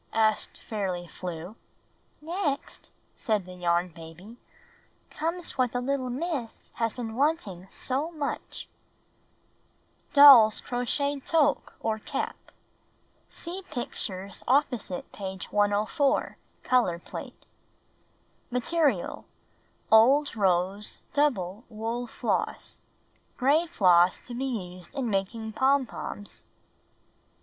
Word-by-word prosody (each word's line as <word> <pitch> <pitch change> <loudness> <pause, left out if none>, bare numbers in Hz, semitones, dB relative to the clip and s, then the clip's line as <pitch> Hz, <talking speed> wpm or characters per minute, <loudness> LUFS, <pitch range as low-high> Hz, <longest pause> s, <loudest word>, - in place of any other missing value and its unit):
asked 220 -1 +1
Fairly 190 -5 -3
Flew. 175 +3 -7 0.7
''Next/* 320 -4 -3 0.3
said 210 -5 -1
the 185 - -10
Yarn 175 0 +1
Baby, 165 +7 -12 0.7
''comes 330 -1 -3
what 250 -2 +2
the 245 - 0
little 260 0 -1
Miss 270 -3 -4
has 230 -1 0
been 230 -3 -5
wanting 230 - 0
so 280 +6 -2 2.0
Doll's 275 -8 +9
Crocheted 275 +3 -1
Toque 305 -3 +2
or 220 -1 -1
Cap - - -3 0.9
(See 355 +3 -6
pictures 200 -7 -5
opposite 250 -8 0
page 190 -2 -6
104 210 +7 +1
— - - -39
color 240 -9 +2
plate) - - -9 1.0
Material: 285 +5 0 0.7
Old 260 +6 +6
rose 195 0 0 0.2
(double) 230 -9 +1
wool 230 +2 -3
floss. - - -3 0.6
Gray 295 +6 +3
floss 180 - +4
to 245 - -9
be 255 +3 -2 0.3
used 180 - -14
in 255 -5 -1
making 220 +3 -2
pom 270 +3 +3
poms. 205 -3 -8
230 Hz, 100 wpm, -27 LUFS, 195-280 Hz, 2.0 s, Doll's